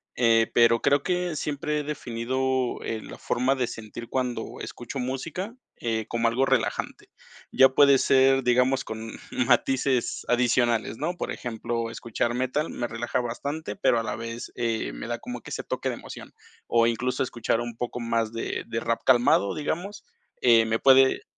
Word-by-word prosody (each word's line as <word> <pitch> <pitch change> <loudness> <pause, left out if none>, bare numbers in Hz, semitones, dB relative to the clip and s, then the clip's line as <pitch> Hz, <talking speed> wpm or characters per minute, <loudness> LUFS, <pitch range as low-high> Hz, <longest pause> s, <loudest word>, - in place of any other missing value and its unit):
eh, 115 -2 +3
pero 115 0 +5
creo 140 0 +3
que 180 -1 -1
siempre 150 +1 -2
he - - -3
definido, 130 -2 -2
eh, 110 - -3
la - - -10
forma 130 +3 0
de 125 -2 -1
sentir 115 0 -8
cuando 125 -2 -3
escucho 130 +3 -6
música, 155 - -4 0.2
eh, 110 -2 -2
como 115 0 +1
algo 120 +4 +2
relajante. - - -1 0.4
Ya 135 - +6
puede 140 +1 +6
ser, 135 0 +4
digamos, 125 +2 +3
con 110 0 -6 0.2
matices 130 +1 +1
adicionales, 120 -2 +2
¿no?, 160 +7 -2
por - - -3
ejemplo, 115 -1 -3
escuchar 115 +1 -2
metal 130 +5 -1
me 120 - -3
relaja 115 +2 -2
bastante, 140 +8 -4
pero 120 - +3
a - - -2
la - - -3
vez, 115 +1 -6
eh, 115 - -1
me - - -7
da - - -3
como - - -6
que - - -11
ese - - -4
toque - - -3
de - - -3
emoción, - - -10 0.3
o 115 -1 +3
incluso 125 +3 0
escuchar 120 -2 -1
un 120 -1 -6
poco 125 0 -4
más 115 -1 -1
de 115 - -3
de 115 -1 -2
rap 115 0 -1
calmado, 120 -5 +4
digamos, 180 +7 -4 0.4
eh, 115 -2 +6
me 115 0 +1
puede 135 0 +5
120 Hz, 170 wpm, -26 LUFS, 115-135 Hz, 0.4 s, Ya